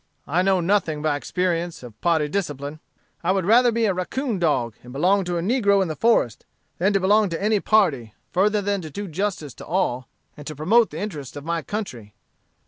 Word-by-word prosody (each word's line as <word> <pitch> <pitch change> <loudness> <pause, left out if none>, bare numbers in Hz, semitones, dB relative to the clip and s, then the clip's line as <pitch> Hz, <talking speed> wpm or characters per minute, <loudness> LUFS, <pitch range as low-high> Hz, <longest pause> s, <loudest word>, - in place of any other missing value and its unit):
"I 165 +5 +1
know 190 -1 +2
nothing, 170 -5 0
by 155 -2 +1
experience, 175 0 -2
of 115 -3 -12
party 165 -3 +2
discipline. 145 -4 -4 0.4
I 175 - +2
would 190 -2 0
rather 240 +4 +5
be 230 0 +1
a 200 - +2
raccoon 215 +5 -2
dog, 130 -9 +1
and 125 - -11
belong 185 +8 +2
to 175 -1 -2
a 170 - -2
negro 200 -2 +3
in 190 -3 0
the 155 - -3
forest, 225 - +2 0.4
than 190 +4 +3
to 195 - +3
belong 205 +2 +3
to 165 - -3
any 210 +1 +2
party, 155 - +2 0.2
further 205 +3 +2
than 200 -1 -1
to 160 - -7
do 200 +7 -6
justice 170 -4 -3
to - - -11
all, 140 -9 -1 0.3
and 145 - -11
to 155 - -5
promote 210 - +3
the - - -8
interests 150 -11 -6
of 145 0 -8
my 170 0 -1
country. 125 - -6
180 Hz, 210 wpm, -23 LUFS, 150-205 Hz, 0.4 s, rather